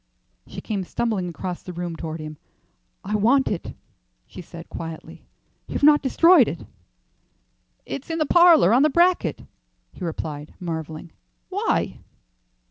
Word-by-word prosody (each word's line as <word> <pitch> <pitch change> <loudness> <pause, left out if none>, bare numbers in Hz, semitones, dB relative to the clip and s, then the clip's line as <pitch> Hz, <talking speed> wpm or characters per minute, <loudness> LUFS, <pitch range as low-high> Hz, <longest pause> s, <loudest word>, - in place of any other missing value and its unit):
She - - -8
came 205 -4 -3
stumbling 195 -2 -2
across 180 +1 -5
the 180 - -9
room 175 -1 -4
toward 160 0 -6
him. 155 -1 -8 0.7
"I 210 +2 -2
want 245 +6 +3
it," 185 - -5 0.5
she - - -10
said, 170 0 -11
quietly. 165 -1 -9 0.4
"You've - - -4
not 295 0 +6
destroyed 330 +7 +5
it?" - - -6 1.2
"It's 275 - -7
in 325 - -2
the 310 - +1
parlour, 335 - +6
on 250 - +5
the 305 - +4
bracket," 345 +4 +2 0.5
he - - -10
replied, 155 -3 -5
marvelling. 160 -1 -6 0.4
"Why?" - - -1
185 Hz, 135 wpm, -23 LUFS, -, 1.2 s, not